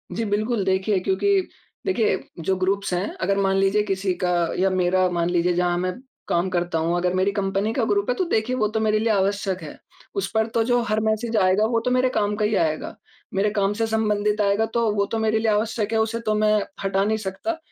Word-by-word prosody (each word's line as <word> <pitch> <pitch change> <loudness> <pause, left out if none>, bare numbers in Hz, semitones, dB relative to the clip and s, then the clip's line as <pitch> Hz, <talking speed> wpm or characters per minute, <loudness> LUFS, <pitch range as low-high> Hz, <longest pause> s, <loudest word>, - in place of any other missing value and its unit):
जी 230 - -1
बिल्कुल। 215 +1 0
देखिए, 190 +1 +1
क्योंकि 195 - +2 0.5
देखिए, 230 - +1 0.2
जो 190 +4 0
ग्रुप्स 195 +1 -1
हैं 180 +3 -1
अगर 195 +2 +1
मान 195 -1 +2
लीजिए 195 +2 +3
किसी 195 -2 -1
का 180 - +2 0.3
या 190 +1 +3
मेरा 185 0 +2
मान 170 -1 0
लीजिए 175 0 +1
जहाँ 175 0 +1
मैं 180 +1 -1 0.3
काम 175 +2 +1
करता 175 -2 -1
हूँ 165 +2 0
अगर 180 0 0
मेरी 185 +2 +1
कंपनी 200 +1 -1
का 250 - 0
ग्रुप 205 +1 0
है 250 - +2
तो 370 - 0
देखिए 225 0 0
वो 215 -4 +1
तो 220 +1 -2
मेरे 215 -1 +2
लिए 225 +1 0
आवश्यक 195 -2 0
है। 155 - -9 0.4
उस 395 - -1
पर 220 0 +1
तो 230 - +2
जो 245 +1 +2
हर 215 0 +2
मैसेज़ 220 +1 0
आएगा 190 +2 +3
वो 230 +1 +1
तो 250 - +1
मेरे 255 0 +3
काम 210 -3 0
का 210 - 0
ही 210 0 +1
आएगा, 155 -4 -1 0.4
मेरे 195 +2 +2
काम 205 -1 0
से 225 +2 -1
संबंधित 210 -1 0
आएगा 200 +2 +2
तो 235 -2 +2
वो 200 -1 +2
तो 225 - 0
मेरे 220 0 +1
लिए 220 -1 +1
आवश्यक 215 0 -1
है, 220 - +2
उसे 225 +1 0
तो 215 -2 -1
मैं 215 0 +3 0.2
हटा 195 0 +1
नहीं 215 +2 +1
सकता। 215 - -4
205 Hz, 230 wpm, -23 LUFS, 190-220 Hz, 0.5 s, लीजिए